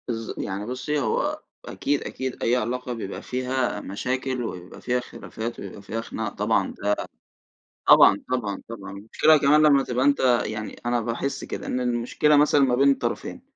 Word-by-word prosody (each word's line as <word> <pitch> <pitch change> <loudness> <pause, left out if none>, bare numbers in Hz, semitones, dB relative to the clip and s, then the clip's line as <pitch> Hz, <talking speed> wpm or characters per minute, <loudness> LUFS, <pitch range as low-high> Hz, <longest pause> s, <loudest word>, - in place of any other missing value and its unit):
بالض 115 -2 -4
يعني 100 +1 -4
بُصي 130 +5 -2
هو 120 -6 -1 0.2
أكيد 145 0 -1
أكيد، 130 -1 -5
أي 120 - +3
علاقة 125 +1 -2
بيبقى 105 -4 -6
فيها 130 0 -2
مشاكل 130 +5 -3
وبيبقى 90 -5 -7
فيها 125 0 0
خلافات 115 -1 -7
ويبقى 100 +1 -8
فيها 110 +3 -4
خناق - - -5
طبعًا، - - 0
ده 105 0 +2 0.9
طبعًا، 100 - +7
طبعًا، 105 -6 -2
طبعًا. 115 -4 -8
المشكلة 110 +10 +3
كمان 150 +1 +4
لمّا 145 -3 +5
تبقى 125 +1 -1
أنتَ 145 0 +3 0.3
يعني 110 0 -6
أنا 120 0 +1
باحِس 120 +5 -3
كده - - -6
إن 125 - -2
المشكلة 125 +5 +2
مثلًا 145 0 +4
ما 130 -3 +3
بين 140 +2 +5
الطرفين، 135 - -2
125 Hz, 165 wpm, -24 LUFS, 110-135 Hz, 0.9 s, طبعًا